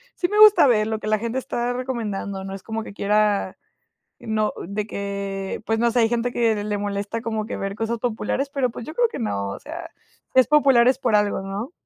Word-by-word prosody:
sí 355 - 0
me 420 +1 +1
gusta 425 -7 +8
ver 215 -3 +3
lo 220 -1 -2
que 215 - -6
la 215 0 +2
gente 235 +3 -3
está 245 -1 -2
recomendando, 215 -6 -4
¿no? 195 - -6
Es 195 - -10
como 225 0 -4
que 205 - -9
quiera 210 0 +1 0.6
no 215 -1 -1 0.2
de 205 +1 -3
que 200 -1 -4
pues 225 0 0
no 235 0 +2
sé, 245 - +1
hay 225 -1 +4
gente 240 0 0
que 225 -3 +1
le 210 -1 -2
molesta 205 +2 -3
como 220 -2 -2
que - - -5
ver 195 0 -4
cosas 225 +1 -2
populares, 250 +4 -2
pero 270 -3 0
pues 230 - -8
yo 310 - -7
creo 485 - +3
que 285 - -7
no, 100 - -2
o - - -6
sea, 330 +3 -8 0.5
es 260 - +6
popular 275 -5 +5
es 255 0 +4
por 240 -5 +2
algo, 205 -2 +1
¿no? 200 +8 -5
225 Hz, 230 wpm, -23 LUFS, 205-245 Hz, 0.6 s, gusta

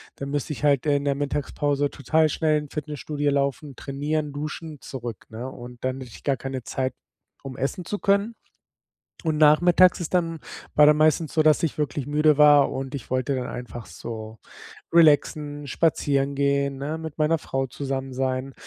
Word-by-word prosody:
da 140 - -6
müsste 145 +1 -3
ich 145 - -9
halt, 140 -1 +3
äh, 145 -1 +3
in 140 - -4
der 140 -1 +1
Mittagspause 145 0 -1
total 155 +3 +1
schnell 155 0 +1
in 150 -1 -9
Fitnessstudio 150 -1 -3
laufen, 140 0 -1
trainieren, 145 +2 -3
duschen 155 0 -6
zurück, 120 -4 -7
ne? 120 +4 -6
Und 125 -1 -11
dann 130 +1 -2
hätte 125 -3 -9
ich - - -13
gar 135 -2 +1
keine 130 -1 -5
Zeit, 130 0 -2 0.5
um 130 -2 -8
essen 140 +6 -3
zu 205 - -4
können. 200 +3 +1 0.9
Und 155 -1 0
nachmittags 175 +4 +5
ist 175 +2 -4
dann 165 -2 0 0.3
war 150 - +7
dann 150 0 +6
meistens 155 +1 +2
so, 155 - +3
dass 155 +1 +4
ich 160 -2 -1
wirklich 145 -2 -2
müde 150 0 +3
war 145 -1 +6
und 135 0 -5
ich 135 - -6
wollte 130 +1 0
dann 125 -1 -3
einfach 120 -1 -7
so 110 -1 -8 0.5
relaxen, 150 -2 +3
spazieren 140 -3 +1
gehen, 140 0 0
ne, 150 +4 -3
mit 160 -1 -8
meiner 155 +1 +2
Frau 135 -1 -2
zusammen 135 0 -4
sein. 130 +1 -2
145 Hz, 180 wpm, -24 LUFS, 135-155 Hz, 0.9 s, war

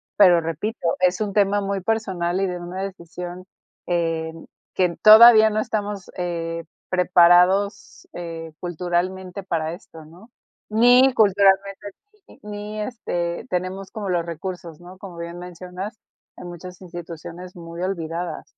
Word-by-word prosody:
pero 180 -4 +6
repito, 165 +7 -4 0.2
es 180 0 +3
un 210 -2 -2
tema 205 0 +3
muy 200 -1 -2
personal 190 -4 -1
y 195 - +1
de 180 -1 -4
una 180 +2 -6
decisión, 180 -1 -7 0.4
em, 165 -2 -2 0.3
que 185 - +2
en 170 -1 -2
todavía 220 0 +9
no 215 0 -1
estamos, 205 -3 -3
eh, 170 -2 -3 0.2
preparados, 180 +2 +3
eh, 165 -2 -7
culturalmente 180 +2 -3
para 165 -3 -2
esto, 165 -3 -13
¿no? 175 +9 -16 0.4
Ni 245 +4 +5
culturalmente, 200 -1 +3 0.4
sí. - - -19
Ni, 210 +1 -6
este, 175 -7 -3
tenemos 185 +2 -3
como 215 -3 -5
los 175 -2 0
recursos, 170 -1 -7
¿no? 180 +2 -13
Como 185 -3 -10
bien 170 +1 -7
mencionas, 180 +4 -8 0.4
hay - - -9
muchas 175 +1 -9
instituciones 175 0 -9
muy 170 0 -9
olvidadas. 170 -2 -4
180 Hz, 135 wpm, -22 LUFS, 170-200 Hz, 0.4 s, todavía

